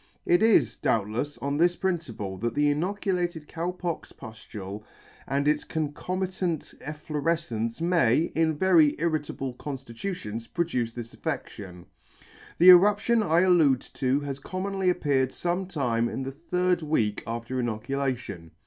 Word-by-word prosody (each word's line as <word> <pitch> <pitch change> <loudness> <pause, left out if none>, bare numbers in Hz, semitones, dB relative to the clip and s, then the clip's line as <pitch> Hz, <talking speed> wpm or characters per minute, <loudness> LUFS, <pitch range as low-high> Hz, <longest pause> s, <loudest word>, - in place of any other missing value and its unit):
It 175 +1 +4
is, 205 - +4
doubtlefs, 115 +6 0
on 140 +1 -1
this 175 +2 +3
principle 130 - -3
that 120 +2 -2
the 145 0 +3
inoculated 175 -1 -1
Cow 170 +2 -3
pock 180 -2 -4
puflule 105 -3 -9 0.5
and 140 +1 0
its 150 0 +2
concomitant 180 +3 -3
efflorefcence 150 -5 -2
may, 165 -4 +3
in 160 -1 +1
very 165 -4 +5
irritable 150 -5 -2
conftitutions, 125 - -6
produce 130 -10 -1
this 115 -1 -8
affeCtion. 90 -3 -6 0.7
The 180 +2 +8
eruption 205 +5 +5
I 170 -4 +3
allude 160 -8 +4
to 135 +1 +1
has 140 -1 -4
commonly 190 +3 -2
appeared 140 -7 +1
fome 180 +5 -2
time 120 -8 0
in 135 - -4
the 135 - -4
third 180 +4 0
week 120 -10 0
after 115 +2 -3
inoculation. 120 -6 -3
150 Hz, 130 wpm, -27 LUFS, 120-175 Hz, 0.7 s, The